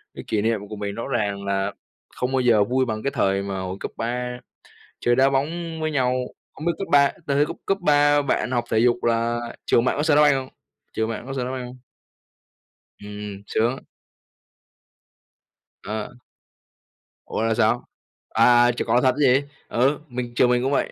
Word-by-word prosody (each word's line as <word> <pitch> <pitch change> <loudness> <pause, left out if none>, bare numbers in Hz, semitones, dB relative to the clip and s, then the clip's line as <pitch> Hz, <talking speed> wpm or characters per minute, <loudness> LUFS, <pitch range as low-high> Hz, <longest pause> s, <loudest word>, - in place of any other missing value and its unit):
Cái - - -7
kỷ 105 - 0
niệm 110 -2 -1
của 105 - -6
mình 100 -1 -4
rõ 115 - -5
ràng 100 -3 -2
là 100 0 -1 0.4
không 125 +1 -2
bao 130 - +2
giờ 115 -4 +4
vui 130 +5 +1
bằng 110 -2 -4
cái 140 - 0
thời 100 -7 +1
mà 100 -1 -4
hồi 95 +1 -5
cấp - - -5
3 125 +1 -3 0.6
chơi 120 - +2
đá 135 +2 +4
bóng 160 +4 -2
với 155 0 -1
nhau. 130 -4 +1 0.4
Không 155 - -8
biết 170 - +2
cấp 195 - -3
ba 140 -1 +6 0.2
tới 140 -1 +1
tới 145 - +4
cấp - - -6
cấp 195 - +1
3 145 -2 +4
bạn 135 -2 -1
học 120 -2 +1
thể 110 - +3
dục 120 +1 +2
là 115 0 +1 0.3
trường 120 - +3
bạn 130 - +1
có 150 - 0
sân 155 -2 +3
đá - - +6
banh 145 -2 +5
hông? 130 -1 -4 0.4
Trường 110 0 -1
bạn 115 +1 -5
có 135 - -5
sân 130 -2 -2
đá 125 - -3
banh 130 -1 -4
hông? 125 +1 -10 1.2
Ừm, 105 -1 -8
sướng. 120 +4 0 2.0
Ờ. 110 +3 -5 1.1
Ủa, - - -3
là 115 0 +2
sao? 115 +1 +1 0.4
À, 120 +1 +5
trượt 120 - -4
cỏ 120 +2 +3
thật 130 - +4
chứ - - -1
gì? 135 - +3 0.3
Ừ, 135 +5 +2
mình 120 -1 -5
trường 125 - +4
mình 125 0 +2
cũng 135 - 0
vậy, 140 - 0
120 Hz, 200 wpm, -23 LUFS, 110-135 Hz, 2.0 s, ba